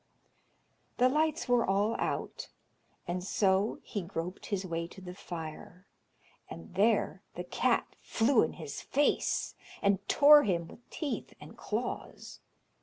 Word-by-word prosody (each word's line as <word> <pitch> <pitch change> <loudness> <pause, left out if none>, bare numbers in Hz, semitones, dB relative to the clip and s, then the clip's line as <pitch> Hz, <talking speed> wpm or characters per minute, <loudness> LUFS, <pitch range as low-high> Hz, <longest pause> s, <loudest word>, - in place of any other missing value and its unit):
The 250 - +5
lights 300 -1 +1
were 245 -1 +4
all 200 +4 +1
out, - - -3 0.6
and 180 +1 -2
so 195 +2 +1
he 205 - -4
groped 175 0 -5
his 195 -2 -2
way 170 -1 -3
to 180 - -13
the 180 -1 -8
fire, 175 0 -8 0.6
and 85 0 -10
there 220 +4 +2
the - - -4
cat - - 0
flew 230 +2 +3
in 160 - 0
his 155 -4 -7
face, 290 +2 +1 0.3
and 200 -1 +2
tore 295 +1 +8
him 170 -8 -1
with 240 - -16
teeth 300 -4 -4
and - - -12
claws. - - -5
195 Hz, 135 wpm, -31 LUFS, 175-240 Hz, 0.6 s, tore